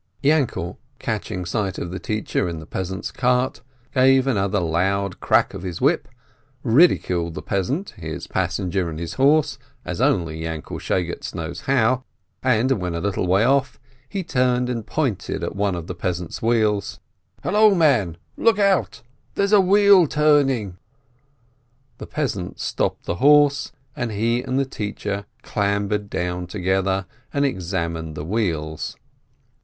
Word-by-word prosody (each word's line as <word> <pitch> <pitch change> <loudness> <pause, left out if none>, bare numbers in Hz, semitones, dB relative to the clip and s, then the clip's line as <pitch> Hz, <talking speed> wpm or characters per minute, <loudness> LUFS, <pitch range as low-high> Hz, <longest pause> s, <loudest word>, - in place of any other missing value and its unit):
Yainkel, 145 -2 +1 0.2
catching 90 -1 -3
sight 95 0 -2
of 85 - -4
the 95 - -5
teacher 105 -4 -1
in 85 - -5
the 80 - -9
peasant's 95 +3 -4
cart, 125 -1 +1 0.3
gave 130 0 +5
another 100 -6 +1
loud 90 +3 0
crack - - +2
with 95 - -6
his 90 -2 -5
whip, - - +2 0.6
ridiculed 90 - +3
the 75 - -5
peasant, 130 - -2
his 80 -3 -6
passenger, 90 -2 -1
and 80 - -6
his 85 0 -5
horse, 145 +3 +3 0.3
as - - -3
only 80 -2 +1
Yainkel 80 -1 -5
Shegetz 85 -1 -2
knows 85 -1 -5
how, 130 -1 +2 0.4
and 130 0 +2
when 90 -1 -2
a - - -2
little 95 0 -1
way 95 +4 +4
off, 135 +1 +2 0.3
he 195 - -3
turned 125 -4 +1
and 115 -3 -3
pointed 135 - -2
at - - -3
one 100 -2 0
of 85 -2 -5
the 90 - -5
peasant's 90 -1 -4
wheels. 110 -4 +1 0.4
"Hallo, 210 0 +5
man, 125 - +3 0.2
look 230 -2 +3
out! 195 - +1 0.3
There's 200 +1 +1
a 205 - +8
wheel 200 -2 +6
turning 135 -10 +2 0.6
!" 125 +2 -40
The - - -7
peasant 105 -12 -3
stopped - - -1
the 85 - -2
horse, 145 +3 +4 0.2
and 120 -2 -2
he 115 +4 +1
and 130 +1 -2
the 135 - +2
teacher 105 -4 -4 0.2
clambered 100 0 -1
down 90 -1 -3
together, 95 0 0 0.3
and 140 0 +1
examined 85 - -3
the 75 - -5
wheels. 80 -6 -2
105 Hz, 150 wpm, -22 LUFS, 90-135 Hz, 0.6 s, a